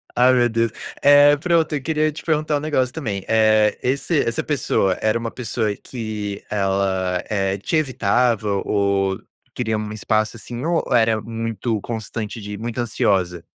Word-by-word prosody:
Ai, 125 +1 +5
meu 120 -1 +3
Deus. 115 0 0 0.3
Eh, 145 +1 +7
pronto, 165 0 +1
eu 140 - -2
queria 155 0 0
te 150 - -9
perguntar 155 -2 +1
um - - -2
negócio 130 -5 0
também, 105 -11 -4
eh, 110 -1 +3
esse 140 +4 +1
essa 115 - -2
pessoa 100 -10 0
era 110 +2 +1
uma 115 0 -3
pessoa 110 -3 -2
que 105 -4 -6
ela, 95 -2 0
eh, 95 -2 0
te 100 - -3
evitava 120 -6 +1 0.2
ou 100 -1 +1 0.3
queria 110 -3 -1
um 105 0 -4
espaço, 110 +1 -1
assim, 120 +3 -7
ou 170 -1 +1
era 115 -2 +3
muito 115 0 -3
constante 110 -1 -5
de 105 0 -6
muito 115 +2 -5
ansiosa? 95 -7 0
115 Hz, 160 wpm, -21 LUFS, 105-130 Hz, 0.3 s, Eh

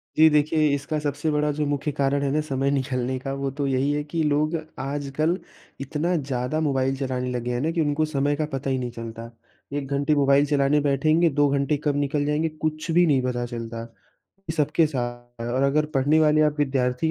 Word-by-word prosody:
जी 160 +1 +7
देखिए, 155 +1 +3
इसका 145 +2 -3
सबसे 145 +1 -2
बड़ा 150 0 +1
जो 150 +1 -1
मुख्य 145 +1 -1
कारण 140 0 0
है 140 - 0
ना 155 +2 +1
समय 140 -2 -1
निकालने 130 -2 -1
का, 135 +1 -4
वो 140 0 -2
तो 140 +1 -3
यही 135 +1 +1
है 150 0 -1
कि 160 +2 -3
लोग 150 +2 +1 0.2
आजकल 145 +4 -1 0.4
इतना 155 +6 -1
ज़्यादा 135 0 -2
मोबाइल 135 -3 +1
चलाने 130 -2 -2
लगे 125 0 -3
हैं 120 - -1
ना, 160 +3 0
कि 165 - 0
उनको 150 +1 +1
समय 145 -1 0
का 155 - -1
पता 135 0 -2
ही 130 - +1
नहीं 125 -1 -4
चलता। 115 0 -8 0.4
1 145 -1 -3
घंटे 140 +2 +1
मोबाइल 140 0 +4
चलाने 145 0 +2
बैठेंगे, 155 +4 +3
2 145 0 +2
घंटे 140 +1 +1
कब 145 -2 +1
निकल 145 +1 0
जाएँगे, 150 +2 0
कुछ 155 +1 -4
भी 175 +2 +5
नहीं 140 -5 +3
पता 120 -1 -1
चलता। 115 -1 -6 0.7
ये - - -3
सबके 155 +2 +3
सा 140 -5 -2 0.4
और 120 +3 -1
अगर 145 +2 +2
पढ़ने 145 +4 +3
वाले 155 0 +4
आप 150 0 +1
विद्यार्थी 135 +1 +1
145 Hz, 205 wpm, -24 LUFS, 135-150 Hz, 0.7 s, जी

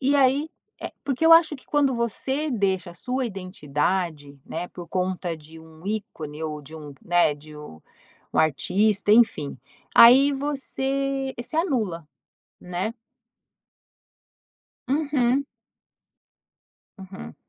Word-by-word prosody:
E 275 +2 +2
aí 280 +3 +3 0.3
eh, - - -6
porque 275 +3 -1
eu 330 - +8
acho 325 -3 +6
que 255 - -19
quando 285 -3 +2
você 265 +6 -2
deixa 190 -6 0
a - - -13
sua 255 +5 -2
identidade, 165 -5 -3
né, 175 +2 -5
por 175 -1 -10
conta 180 -2 -2
de 160 +1 -14
um 160 +1 -16
ícone 160 -8 -5
ou 150 -1 -5
de 155 +3 -13
um 150 -2 -9
né, 175 -4 +3
de 150 +1 -14
u 115 - -11 0.5
um - - +1
artista, 200 +7 +2
enfim, 215 -11 +3 0.4
aí 265 +5 +8
você 275 -1 -2
se 245 - -8
anula, 220 - -1 0.6
né? 180 +5 -3 2.0
Uhum. 280 -2 +1 1.5
Uhum. 185 - -10
200 Hz, 120 wpm, -24 LUFS, 160-270 Hz, 2.0 s, eu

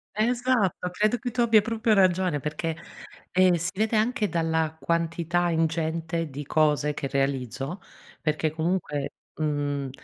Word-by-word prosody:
Esatto, 230 -5 +1
credo 215 +5 +1
che 245 +1 -4
tu 245 - 0
abbia 225 -2 +5
proprio 225 0 +1
ragione 185 -5 +3
perché 155 +2 -3 0.6
eh 185 -1 +4
si 170 - 0
vede 220 +2 +1
anche 215 -1 +1
dalla 160 -2 0
quantità 170 +1 0
ingente 165 0 -1
di 140 +1 -7
cose 150 -1 +2
che 140 - -3
realizzo 135 - -2 0.4
perché 155 0 0
comunque 160 -3 -2 0.3
mhmm 145 -2 -1
165 Hz, 130 wpm, -26 LUFS, 150-200 Hz, 0.6 s, abbia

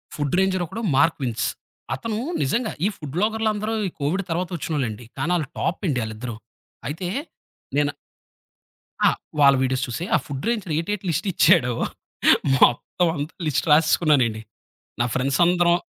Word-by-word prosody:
Food 145 +1 -1
ranger 190 -1 +2
ఒకడు 225 +8 -6
'Mark Wiens'. 130 -5 +1 0.5
అతను 225 -2 -4 0.2
నిజంగా 215 - 0
ఈ - - +5
ఫుడ్ 150 -2 -8
వ్లాగరలందరు. 215 +1 0
ఈ - - -3
కోవిడ్ 170 +8 0
తర్వాత 175 +2 -1
ఒచ్చినోళ్ళండి. 125 -9 -3
కానీ 165 - -1
ఆళ్ళు 155 -5 -1
టాప్ 170 - -1
అండి 135 -5 +1
ఆళ్ళిద్దరు. 110 +2 -5 0.5
అయితే. 165 +6 -4 0.7
నేను 145 0 +2 1.1
ఆ! - - +7 0.3
వాళ్ళ 140 -1 +7
వీడియోస్ 130 0 0
చూసే 125 +8 -4
ఆ - - +6
ఫుడ్ 140 -2 -5
రేంజర్ 210 -9 -1
ఏటేటి 200 +3 -3
లిస్ట్ 165 +5 -1
ఇచ్చాడో 155 -8 +4 0.8
మొత్తం 130 +8 +3
అంత 145 +2 -3 0.2
లిస్ట్ 150 - 0
రాసేసుకున్నానండి. 150 -7 +4 0.6
నా - - +4
ఫ్రెండ్స్ 135 +1 0
అందరం 175 0 +4
155 Hz, 140 wpm, -23 LUFS, 130-180 Hz, 1.1 s, ఆ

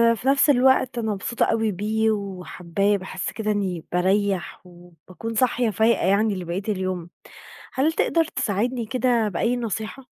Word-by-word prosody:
في 235 - -6
نفس 275 +2 +4
الوقت 260 -1 +4
أنا 220 -2 -1
مبسوطة 215 +4 -1
أوي 225 -1 +1
بيه، 220 +3 0
وحابّاه 195 -1 -1
باحس 185 0 -5
كده 215 0 -2
إنّي 185 -5 -2
بارَيّح 190 +1 0
وباكون 175 +4 -10
صاحية 245 0 +2
فايقة 220 0 +2
يعني 205 +2 +2
لبقية 180 +1 -4
اليوم، 185 -4 -2 0.6
هل 300 +5 +1
تقدر 330 +1 +2
تساعدني 240 -2 -1
كده 240 -2 +1
بأي 230 +7 0
نصيحة؟ 225 +2 -4
215 Hz, 140 wpm, -23 LUFS, 185-235 Hz, 0.6 s, نفس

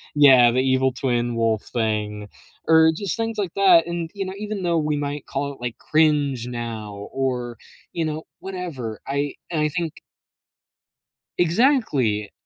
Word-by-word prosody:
Yeah, 130 -5 +7
the 130 - +1
evil 130 0 +2
twin 120 -2 -1
wolf 115 -2 +1
thing, 105 -2 -2 0.4
or 160 0 +6
just 195 0 -3
things 225 -1 -3
like 195 -5 -2
that, 180 -4 +5
and, 170 -1 -4
you 195 -1 -3
know, 190 - -5
even 210 -2 -4
though 170 -1 +1
we 150 -1 0
might 145 0 -4
call 140 +1 -3
it, - - -17
like, 120 -1 -4
"cringe" 145 -6 +1
now 110 -4 -6
or, 125 -3 -2 0.4
you 165 - -1
know, 155 +1 -3 0.2
whatever, 165 - -5
I 140 +1 -1 0.2
and 160 -3 -1
I 150 - +2
think 165 0 -3 1.4
Exactly. 165 - +2
145 Hz, 155 wpm, -23 LUFS, 120-170 Hz, 1.4 s, Yeah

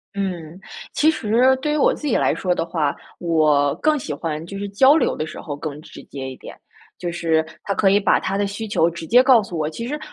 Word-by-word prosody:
嗯， 180 -3 -4 0.3
其 315 +2 +3
实 250 +1 +2
对 300 - -1
于 - - 0
我 290 - +3
自 300 - -6
己 250 - +1
来 - - +2
说 180 -2 -1
的 165 - -2
话， 150 -4 -1 0.2
我 155 -4 +2
更 305 -1 +1
喜 165 - -6
欢 155 +1 -4
就 195 +3 -8
是 200 0 -4
交 265 +9 +5
流 - - +1
的 155 - -3
时 - - -9
候 145 - -6
更 150 -1 -6
直 - - -13
接 135 -2 -7
一 - - -9
点， - - -11 0.4
就 175 -1 -4
是 160 -2 0 0.2
他 200 - -2
可 195 -1 +3
以 205 - +4
把 195 - +3
他 195 - -3
的 200 0 0
需 215 +2 -6
求 170 -5 +2
直 170 -1 -8
接 245 +8 +6
告 255 -5 +5
诉 180 - -8
我。 155 0 -1
其 230 +9 -6
实 300 +2 -4
185 Hz, 265 characters per minute, -21 LUFS, 160-230 Hz, 0.4 s, 接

